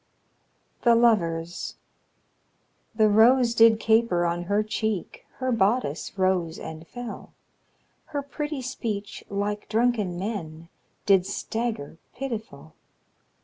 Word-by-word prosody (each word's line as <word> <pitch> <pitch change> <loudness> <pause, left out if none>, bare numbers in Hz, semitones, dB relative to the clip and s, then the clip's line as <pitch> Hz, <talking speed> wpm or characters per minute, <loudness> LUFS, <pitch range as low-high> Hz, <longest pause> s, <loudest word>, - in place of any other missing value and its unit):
THE 235 -1 +5
LOVERS. 175 -8 +1 1.2
The 220 -1 +5
rose 235 +3 +5
did 225 -1 +6
caper 220 -6 +3
on 170 +1 -1
her 205 +3 +1
cheek, 215 -2 -3
Her 255 0 -2
bodice 200 - 0
rose 185 -3 +1
and 160 +1 -8
fell, 245 -2 -8 0.7
Her 285 -2 -4
pretty 295 -1 -4
speech, 215 -5 -4
like 205 +1 -3
drunken 220 -5 +1
men, 170 -5 -5 0.4
Did 195 -2 +4
stagger 215 -6 -4 0.2
pitiful. 220 - -6
215 Hz, 105 wpm, -26 LUFS, 175-235 Hz, 1.2 s, did